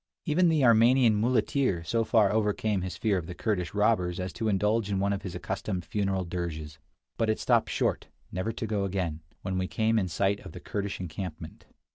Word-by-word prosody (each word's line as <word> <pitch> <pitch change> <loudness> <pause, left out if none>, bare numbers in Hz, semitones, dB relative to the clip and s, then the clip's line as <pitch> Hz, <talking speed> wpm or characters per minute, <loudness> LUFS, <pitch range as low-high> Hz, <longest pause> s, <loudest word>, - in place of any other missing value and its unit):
Even 175 +2 +3
the 155 -5 +3
Armenian 115 0 +5
muleteer 120 -3 +1
so 115 +7 0
far 110 -3 +3
overcame 105 -1 +1
his 95 0 -5
fear 105 -4 +1
of 85 - -8
the 90 - -7
Kurdish 90 -4 -2
robbers 95 -4 +2
as 90 -2 -4
to 110 - -2
indulge 105 +1 +1
in 100 - 0
one 100 +1 +1
of 100 - -3
his 95 -3 -6
accustomed 90 -2 -3
funeral 95 -3 -1
dirges; 80 -3 -5 0.4
but 115 - +1
it 110 - +1
stopped - - +2
short, - - 0 0.2
never 95 +5 -2
to 115 - -4
go 105 -2 -1
again, 90 -5 -2 0.2
when 95 0 -1
we 95 - -1
came 110 +2 +1
in 95 - -1
sight 100 +3 0
of - - -11
the - - -8
Kurdish 100 -1 -4
encampment. 85 -2 -7
100 Hz, 200 wpm, -28 LUFS, 90-110 Hz, 0.4 s, Armenian